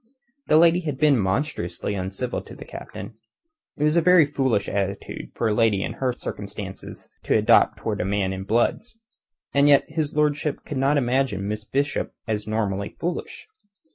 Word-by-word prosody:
The 155 - +5
lady 170 +1 +5
had 150 -6 -4
been 145 -3 +4
monstrously 95 - -2
uncivil 95 +6 -3
to - - -12
the - - -10
Captain. - - -9 0.6
It 145 - -1
was 150 +1 +3
a 170 - +5
very 180 -1 +6
foolish 130 -7 0
attitude 100 0 -3
for 115 - 0
a 110 - +1
lady 105 -3 +2
in - - -3
her 130 -1 -1
circumstances 100 -5 -7
to - - +2
adopt - - +4
towards - - -2
a - - -2
man 95 -1 0
in 95 0 -5
Blood's; 120 - 0 0.6
and 140 +1 +5 0.2
his 150 -1 -2
lordship 150 -1 0
could 145 - -5
not 140 +2 +3
imagine 125 -6 0
Miss 105 0 -4
Bishop 140 +5 -1
as 105 -2 -3
normally 100 -2 -2
foolish. 175 +1 -4
125 Hz, 170 wpm, -24 LUFS, 100-150 Hz, 0.6 s, very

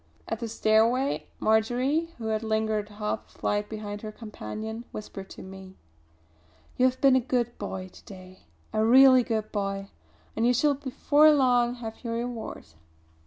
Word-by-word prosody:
At - - -3
the 235 - -4
stairway 225 +5 +2
Marjory, 250 +9 +1
who 225 -2 -4
had 215 0 0
lingered 220 -1 -1
half 210 +1 -4
a - - -23
flight 205 0 -1
behind 210 -1 -6
her 215 - -6
companion, 220 - -7
whispered 195 -2 -8
to - - -10
me: 190 0 -11 1.0
"You 255 - +4
have 255 0 -2
been 270 -2 +6
a - - +5
good 240 -1 -1
boy 190 -2 -5
to - - -17
day, 185 - -13 0.3
a 215 - +2
real 260 +2 +7
good 220 -2 -2
boy; 195 -1 -3 0.4
and 225 +2 +2
you 245 - +3
shall 290 +4 +3
before 290 +2 +3
long 245 -4 +3
have 225 -1 -8
your 230 -1 -3
reward." 235 -1 -5
220 Hz, 165 wpm, -27 LUFS, 210-250 Hz, 1.0 s, real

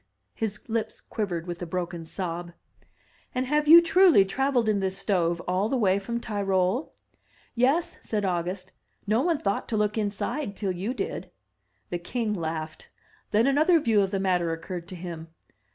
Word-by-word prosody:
'* - - -50
His 210 -2 -4
lips 225 -1 -2
quivered 180 -7 -3
with 175 -1 -6
a 175 - -4
broken 175 -1 -4
sob. 175 0 -5 0.8
"And 255 +1 0
have 300 +3 +1
you 335 +2 +10
truly 335 - +6
traveled 255 +2 +1
in 210 -2 +2
this 190 0 -1
stove 175 -4 +1
all 185 +4 +1
the 265 - +1
way 195 -4 +3
from 235 +4 -3
Tyrol?" 200 +2 0 0.6
"Yes," 265 +8 +1
said 210 -2 -2
August, 185 +1 -2 0.3
"no 215 +3 +2
one 335 +1 +2
thought 200 -6 -1
to 220 - 0
look 210 +1 +1
inside 205 +3 -2
till 195 -2 -2
you 195 +8 -3
did." - - -4 0.6
The 175 - -2
king 220 +4 -2
laughed; 160 -3 -5 0.4
then 215 +2 +3
another 310 +5 +4
view 225 -7 +3
of 195 - +1
the 195 0 -1
matter 180 -3 +1
occurred 170 +1 -5
to 185 - -8
him. 170 -2 -7
200 Hz, 170 wpm, -26 LUFS, 180-235 Hz, 0.8 s, you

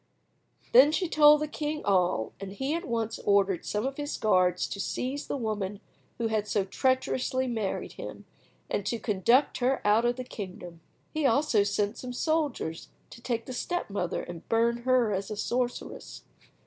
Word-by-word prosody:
Then 265 +5 +8
she 360 +3 0
told 300 -1 +6
the 305 - -1
king 300 0 -4
all, 180 - +1
and 195 0 -7
he 265 +7 -2
at 340 +1 -3
once 230 -2 -2
ordered 200 -3 +2
some 210 +3 -1
of 270 0 -3
his 290 0 -3
guards 185 -4 +2
to 200 - -5
seize 260 +7 -3
the - - -2
woman 210 -4 -3 0.4
who 230 -1 -1
had 215 -1 0
so 200 -1 0
treacherously 260 +3 0
married 220 -6 -2
him, - - -9 0.4
and 205 - -1
to 235 - 0
conduct 230 +6 +2
her 260 +2 +2
out 215 +3 +4
of 240 0 +2
the 255 - -5
kingdom. 180 -7 -8 0.3
He 310 -3 +2
also 270 -3 +3
sent 205 +2 -1
some 250 -1 -6
soldiers 290 - -1 0.2
to 235 - -12
take 235 -2 -2
the 255 - -6
step 350 - -3
mother 180 -3 -2
and 175 -2 -9
burn 230 +1 +2
her 245 -2 +2
as 195 0 -3
a 215 - -5
sorceress. 245 +3 -3
235 Hz, 175 wpm, -28 LUFS, 200-260 Hz, 0.4 s, Then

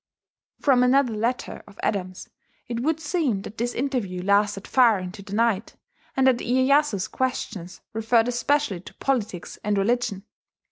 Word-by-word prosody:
From 265 -4 +4
another 250 -1 +3
letter 230 +4 -2
of 200 -1 -16
Adams 185 -2 -2 0.4
it 235 -1 -3
would 315 +5 0
seem 295 - -1
that 215 - -9
this 240 +1 -1
interview 235 -9 -2
lasted 200 0 +2
far 240 -5 +5
into 185 +2 -7
the 200 0 -6
night, 225 -2 +1 0.4
and 265 - +4
that 255 -2 +4
Iyeyasu's 260 -4 +2
questions 200 -10 -3
referred 225 +1 +2
especially 245 -4 0
to 180 - -13
politics 215 -10 -2
and 210 -1 0
religion. 200 -1 0
230 Hz, 145 wpm, -24 LUFS, 200-260 Hz, 0.4 s, far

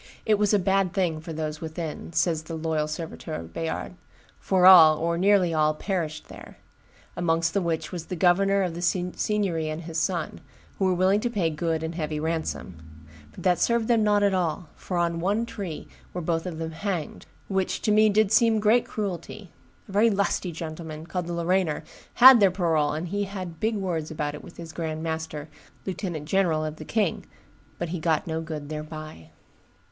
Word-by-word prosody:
"It 215 -2 +3
was 210 -1 +3
a 210 - +5
bad 195 -1 +1
thing 175 -5 0
for 165 - -8
those 155 -1 -4
within," 160 0 -5
says 160 -1 +1
the 160 +1 -7
Loyal 160 -1 -1
Serviteur 160 0 -6
of 80 0 -10
Bayard; - - -4 0.5
"for 185 -1 +2
all, 165 -5 +9
or 170 +1 0
nearly 185 -1 +3
all, 155 -1 +2
perished 160 -4 -3
there; - - -12 0.6
amongst 165 -1 +1
the 200 - +1
which 165 -2 -2
was 175 -3 -5
the 185 - -4
governor 195 +3 +3
of 180 -3 -2
the 170 - -6
Signory 180 -1 -1
and 155 +2 -5
his 165 0 -3
son, 170 -1 -2 0.4
who 195 - +2
were 185 - +3
willing 190 +3 +3
to 240 - -1
pay 185 -8 0
good 160 +1 -2
and 160 +1 -3
heavy 155 -2 -3
ransom; 160 - -3 0.5
but - - -11
that 180 -1 +3
served 235 -1 +2
them 230 -3 +3
not 205 -1 +3
at 200 -1 +3
all, 175 -2 -1
for 180 - -4
on 170 -1 0
one 205 +6 0
tree 195 -9 -6 0.3
were 180 - -2
both 165 +1 -1
of 170 -3 -5
them 160 0 -4
hanged, 170 -1 -4 0.2
which 190 -1 -1
to 215 - +2
me 215 +1 +5
did 210 -1 +2
seem 225 0 +4
great 220 +3 +3
cruelty; 195 -2 -5 0.4
a - - -11
very 210 +4 +4
lusty 200 -3 0
gentleman, 160 -1 -7
called 180 0 -4
the 175 - -3
Lorrainer, 170 -1 0 0.3
had 255 0 +10
their 200 -2 +6
parole, 160 -5 +1
and 160 +3 -4
he 205 +2 -1
had 185 -4 -7
big 220 +1 0
words 175 -6 -2
about 150 -2 -3
it 150 - -9
with - - -12
the 170 - -8
grand 160 -1 -4
master, 160 -2 -4 0.4
lieutenant 180 -5 -4
general 165 -3 +1
of 155 0 -5
the 155 - -9
king; 210 -4 0 0.5
but 175 - -3
he 175 +1 -3
got 160 -1 +1
no 160 -1 -3
good 155 -3 -6
thereby." 155 - -7
170 Hz, 195 wpm, -26 LUFS, 160-195 Hz, 0.6 s, had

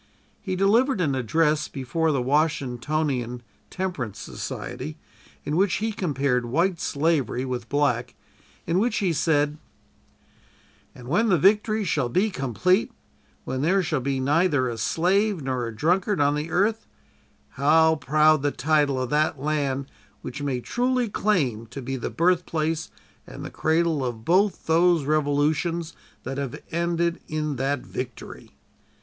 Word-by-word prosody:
He 190 -3 -3
delivered 220 +6 +3
an 150 -6 +1
address 150 +4 +1
before 155 +5 -1
the 135 -4 0
Washingtonian 135 -3 -1 0.3
(Temperance) 175 - -4
Society - - -6 0.5
in 150 - -1
which 190 +2 +2
he 220 +2 -1
compared 140 - 0
white 170 +7 +1
slavery 140 -4 0
with 125 -3 -4
black, 125 -4 0 0.5
in 170 +2 +1
which 225 +1 +1
he 185 -5 +1
said: 150 -1 +1 1.4
"And 125 -1 -11
when 215 - +2
the 180 - +4
victory 210 +5 +3
shall 145 -9 0
be 195 - +1
complete 180 - +1 0.5
when 130 0 -3
there 185 +6 +2
shall 155 -3 -1
be 135 +1 -1
neither 145 0 +2
a 120 - -3
slave 185 - +1
nor 130 -3 -2
a 115 - -7
drunkard 180 - +1
on 145 0 +3
the 150 +2 -3
earth 210 +6 +1 0.6
how 160 +3 +3
proud 155 +1 +3
the 145 - +1
title 145 -2 +1
of 130 -1 -3
that 150 -1 +1
land 140 -2 -1 0.4
which 135 +3 -6
may 135 -3 -2
truly 245 - 0
claim 140 - 0
to 140 - -8
be 135 +1 -4
the 125 - -4
birthplace 165 -2 0 0.4
and - - -8
the - - -7
cradle 160 -2 +1
of 120 -3 -4
both 190 +4 +2
those 165 -1 +3
revolutions 155 +3 0 0.3
that 135 +1 -4
have 135 -3 -4
ended 170 0 0
in 155 -2 -2
that 135 +1 -1
victory." 125 -2 -8
155 Hz, 145 wpm, -25 LUFS, 135-175 Hz, 1.4 s, the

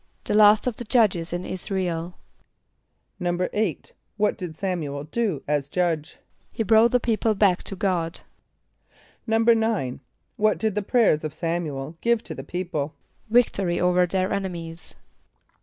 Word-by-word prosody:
=The - - -2
last 210 0 +6
of 250 -3 -2
the - - -5
judges 210 -8 +2
in 175 +1 -3
[)I][s+]´ra 190 0 -3
el.= 170 0 -4 1.0
=8.= 180 +1 -1 0.3
What 210 0 +2
did 175 -4 -7
S[)a]m´u 180 -4 -2
el 140 - -5
do 180 - -2
as 145 -1 0
Judge? 165 -3 -1 0.3
=He 225 - -2
brought 220 +2 +5
the 250 - +3
people 225 -2 +1
back 195 -3 +3
to 195 - -2
God.= 180 -4 -1 1.1
=9.= 225 - +2 0.4
What 215 0 +2
did 220 -2 0
the 210 - -1
prayers 205 -7 +2
of 155 -1 -4
S[)a]m´u 165 -4 -2
el 150 +5 -7
give 235 -1 +2
to - - -7
the 135 - -7
people? 160 -2 -4 0.3
=Victory 200 -7 +2
over 180 0 +3
their 185 +1 0
enemies. 170 -4 -5
185 Hz, 150 wpm, -24 LUFS, 165-215 Hz, 1.1 s, last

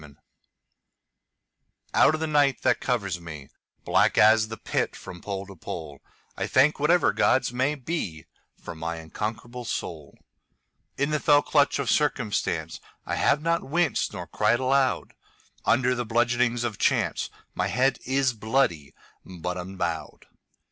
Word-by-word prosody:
Invictus 70 -2 -17 1.7
OUT 155 - +5
of 155 - -6
the - - +1
night 145 -4 +2
that - - +3
covers 100 -8 -2
me, 80 -5 -9 0.4
Black - - +3
as 110 +1 +6
the 110 0 -7
Pit - - -2
from 90 -1 -10
pole 100 -1 -4
to 100 0 -12
pole,I 80 -4 -8
thank 145 +4 +3
whatever 155 +3 +3
gods 130 -1 +2
may 130 +4 +1
beFor 90 - -7
my 80 +1 -4
unconquerable 110 +9 -5
soul.In 90 - -7
the 150 - +1
fell 145 -1 +4
clutch 145 -1 +2
of 140 -3 -2
circumstanceI 125 -6 0 0.3
have 150 - +2
not 165 0 +1
winced 165 -1 +1
nor 90 -3 -6
cried 105 +5 +1
aloud. 130 0 +1 0.5
Under 125 +2 +3
the 120 -1 -2
bludgeonings 120 +1 +1
of 115 -4 -3
chanceMy - - -1
head 130 +3 +1
is 130 0 +1
bloody, 110 - 0 0.3
but 90 -1 -5
unbowed. 90 -2 -4
120 Hz, 130 wpm, -26 LUFS, 90-135 Hz, 1.7 s, as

